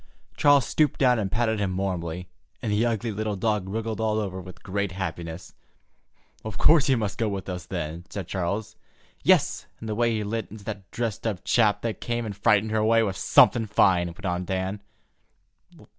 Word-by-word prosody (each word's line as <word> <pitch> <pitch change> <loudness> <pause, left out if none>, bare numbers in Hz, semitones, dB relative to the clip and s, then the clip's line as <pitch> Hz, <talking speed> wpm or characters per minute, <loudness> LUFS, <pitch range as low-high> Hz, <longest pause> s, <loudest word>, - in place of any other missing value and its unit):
Charles 145 -4 +5
stooped 150 +5 +1
down 125 -3 +4
and 95 -3 -2
patted 110 -1 +1
him 95 -2 -1
warmly, 90 -2 -3 0.3
and 110 - -3
the 105 +2 +2
ugly 115 0 -1
little 105 0 -2
dog 105 -1 -1
wriggled 110 +1 -3
all 110 -1 +1
over 95 -3 -3
with 90 0 -12
great 100 0 -2
happiness, 85 -3 -5 0.9
"Of 110 -3 -6
course 155 +2 +5
he 135 - +4
must 105 -4 -3
go 110 -2 +1
with 100 -2 -4
us, 90 -2 -5
then," 85 -1 -4
said 100 -3 -5
Charles. 100 +4 -3 0.5
"Yes, - - +3
and 110 - -7
the 110 - -1
way 120 +2 +2
he 110 -2 -1
lit 110 +1 -3
into 105 0 -11
that 100 -3 -7
dressed 115 -2 -3
up 100 -5 -3
chap 110 -4 +2
that 115 -2 -3
came 120 -1 -2
and 105 -2 -5
frightened 105 +1 +2
her 110 - +1
away 115 +1 +4
was 95 -3 -2
something 115 -2 +5
fine," 90 -4 +3
went 85 +4 -9
on 90 0 -1
Dan. 95 +2 -3
105 Hz, 190 wpm, -26 LUFS, 95-110 Hz, 0.9 s, Charles